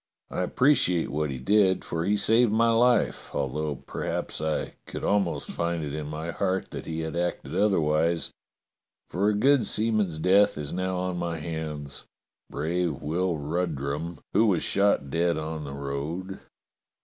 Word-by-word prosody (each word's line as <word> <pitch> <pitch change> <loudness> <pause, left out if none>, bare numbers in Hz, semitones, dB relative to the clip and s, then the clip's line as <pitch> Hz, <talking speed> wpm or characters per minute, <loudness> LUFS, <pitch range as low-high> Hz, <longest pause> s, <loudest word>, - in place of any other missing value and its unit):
I - - -2
appreciate 90 - +3
what 75 +1 -1
he 65 - -4
did, 95 +6 +3
for 80 0 -2
he 105 +1 +2
saved 115 +2 +4
my 115 +2 +3
life, 120 0 +2
although 75 +2 -1
perhaps 70 - -4
I 80 0 -1
could - - -6
almost 100 -4 0
find 85 -1 -2
it 70 -1 -4
in 75 -1 -4
my 80 +3 -4
heart 95 +3 -1
that - - -7
he 80 0 -3
had 80 0 -4
acted 90 +1 -2
otherwise, 85 -4 +2 0.8
for 100 +4 +1
a 105 - +1
good 130 +1 +4
seaman's 105 -6 +1
death 100 +4 +4
is 75 -1 -4
now 95 0 -1
on 90 0 -2
my 85 -1 -2
hands 75 -3 -5 0.2
— - - -58
brave 80 0 -2
Will 85 +2 0
Ru 80 +5 -1
drum, 75 +3 -4 0.2
who 110 +3 +4
was 90 -5 +2
shot 100 -9 +2
dead 85 +1 +1
on 80 0 -4
the 70 - -6
road. 75 +7 -4
85 Hz, 165 wpm, -27 LUFS, 75-100 Hz, 0.8 s, saved